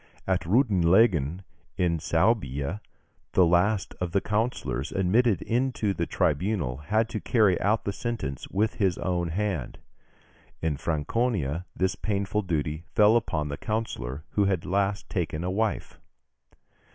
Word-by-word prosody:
At 95 -3 0
Reutlingen, 95 - +3 0.3
in 85 -3 +1
Suabia, 80 - 0 0.5
the 90 - +5
last 90 +4 +2
of 90 -1 -2
the 100 - +4
councillors 105 - -2
admitted 100 +2 +2
into 120 -4 0
the - - -2
tribunal 75 - 0
had 110 +10 0
to 110 -2 -3
carry 105 -8 +2
out 110 +3 +1
the 100 - -1
sentence 100 - -4
with 105 +3 0
his 95 -4 +2
own 90 -2 -1
hand. 95 -6 -2 0.8
In 80 -2 -1
Franconia, 85 - -1
this 95 0 +1
painful 100 0 -1
duty 80 -4 -2
fell 105 +1 +6
upon 80 -10 0
the 70 - -4
councillor 105 - -3
who 100 - +2
had 95 -4 0
last 100 +2 0
taken 85 -3 -2
a 90 - -1
wife. 110 +2 -2
95 Hz, 135 wpm, -27 LUFS, 80-110 Hz, 0.8 s, fell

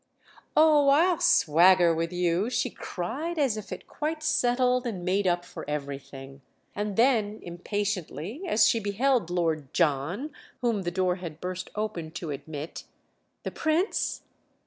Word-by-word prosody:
"Oh, 300 -2 +6
I'll 335 +4 +4
swagger 175 +2 +5
with 165 +1 -2
you!" 180 +4 0
she 250 - -1
cried 280 - -4
as 270 -7 +2
if 215 -2 -8
it - - -7
quite 310 +1 -4
settled 250 -3 +2
and 185 -6 -5
made 190 +1 +1
up 175 0 +1
for 160 - -9
everything; 140 -1 -6 0.3
and 205 -1 -3
then 220 -3 +2
impatiently, 190 - -4
as 215 -9 +4
she 230 - +2
beheld 225 0 +1
Lord 160 -6 -1
John, 170 - 0 0.3
whom 230 -5 +1
the 175 - -2
door 180 0 0
had 170 -4 -8
burst 185 +1 -5
open 210 -7 -3
to 170 -2 -5
admit: 145 +2 -7 0.6
"The - - -4
Prince?" 320 +6 0
190 Hz, 145 wpm, -27 LUFS, 170-245 Hz, 0.6 s, Oh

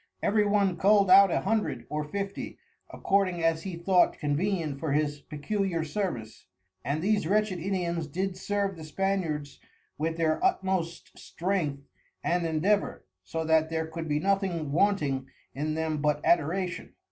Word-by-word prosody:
Every 210 +1 +3
one 200 -3 +2
cull'd 200 -1 +4
out 195 +1 +9
a - - 0
Hundred, 220 +2 -1
or 150 0 -2
Fifty, 200 +5 -5 0.3
according 185 -4 0
as 165 -1 +2
he 185 -1 -5
thought 180 +2 +3
convenient 150 -1 -1
for 155 -2 -1
his 145 -1 0
peculiar 170 +3 -2
service, 155 - -4 0.4
and 145 +5 -2
these 205 -4 +1
wretched 205 -1 +1
Indians 170 -3 -2
did 185 +5 -2
serve 200 0 -2
the 160 - -9
Spaniards 155 -4 -2 0.4
with 165 +1 -1
their 160 - +1
utmost 190 - -1
strength 165 -7 -2 0.4
and 175 -1 +1
endeavour; 185 +6 0 0.2
so 160 +12 -3
that 160 0 +3
there 160 0 -1
could 160 0 -6
be 150 0 +1
nothing 190 -5 0
wanting 150 -7 +1 0.3
in 155 +2 -2
them 160 -2 -1
but 150 0 +1
Adoration. 175 +3 0
170 Hz, 145 wpm, -28 LUFS, 155-195 Hz, 0.4 s, out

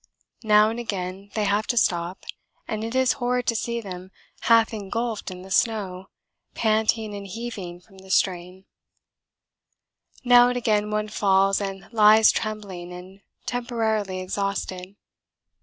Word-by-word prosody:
Now 215 -1 +5
and 230 - -5
again 195 -3 -5
they 215 - 0
have 205 +1 +1
to 240 - -1
stop, 175 -3 0 0.4
and 215 0 -3
it 230 +2 -4
is 260 -1 +3
horrid 250 0 0
to 230 - +1
see 235 +1 -2
them 185 -3 -8 0.3
half 230 -1 +4
engulfed 220 +2 -3
in 185 0 -9
the 190 - -12
snow, 190 -5 0 0.5
panting 220 -1 +1
and 200 -1 -7
heaving 195 -5 -6
from 190 +2 -19
the 190 0 -15
strain. 185 0 0 1.6
Now 245 -1 +7
and 250 0 -1
again 210 -3 +1
one 215 0 -2
falls 195 -1 +2
and 195 -1 -5
lies 215 0 +7
trembling 200 -5 -5
and 185 +2 -11 0.2
temporarily 220 -6 -2
exhausted. 190 0 -4
210 Hz, 140 wpm, -24 LUFS, 190-225 Hz, 1.6 s, Now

